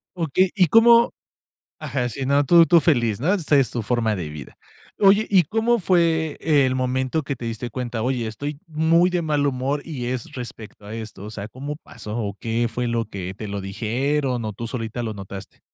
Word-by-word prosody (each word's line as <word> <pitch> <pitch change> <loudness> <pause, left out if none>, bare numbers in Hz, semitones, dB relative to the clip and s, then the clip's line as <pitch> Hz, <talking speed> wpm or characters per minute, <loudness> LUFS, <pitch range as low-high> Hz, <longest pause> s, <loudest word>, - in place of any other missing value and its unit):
Okey, 175 +2 +1
¿y 185 -4 +4
cómo? 235 +4 +6 0.7
Ajá, 125 -3 -2
sí, 130 +3 -4
no, 140 +1 +3
tú 170 +4 +7
tú 170 -1 +6
feliz, 120 - +1
¿no?, 165 +8 +2
esa 160 -6 +1
es, 135 - +2
tu 120 - -3
forma 110 -1 0
de 85 -5 -4
vida. 75 -3 -10 0.4
Oye, 200 +2 +5
¿y 190 -4 +5
cómo 225 +8 +1
fue 165 -4 +1
el 140 -5 +3
momento, 130 +3 -1
que 140 -1 -4
te 120 - -8
diste 115 +1 -4
cuenta? 120 -2 -4
Oye, 125 -1 -1
estoy 140 +7 -5
muy 165 +3 +3
de 175 -1 0
mal 150 -2 +1
humor, 140 +2 -1
y 135 -7 -5
es 125 -2 -4
respecto 115 -4 -9
a 105 - -7
esto. 110 -3 -8
O 105 - -7
sea, 100 -1 -6
¿cómo 140 +6 -6
pasó, 105 -7 -8
o 100 -3 -3
qué 115 +1 0
fue 120 +1 -2
lo 115 -1 0
que 95 -4 -6
te 105 - -7
lo 100 0 -4
dijeron, 120 +6 -1
o 110 - -3
tú 115 +4 -6
solita 115 -1 -4
lo 110 -1 -4
notaste? 95 -1 -9
130 Hz, 205 wpm, -22 LUFS, 115-160 Hz, 0.7 s, tú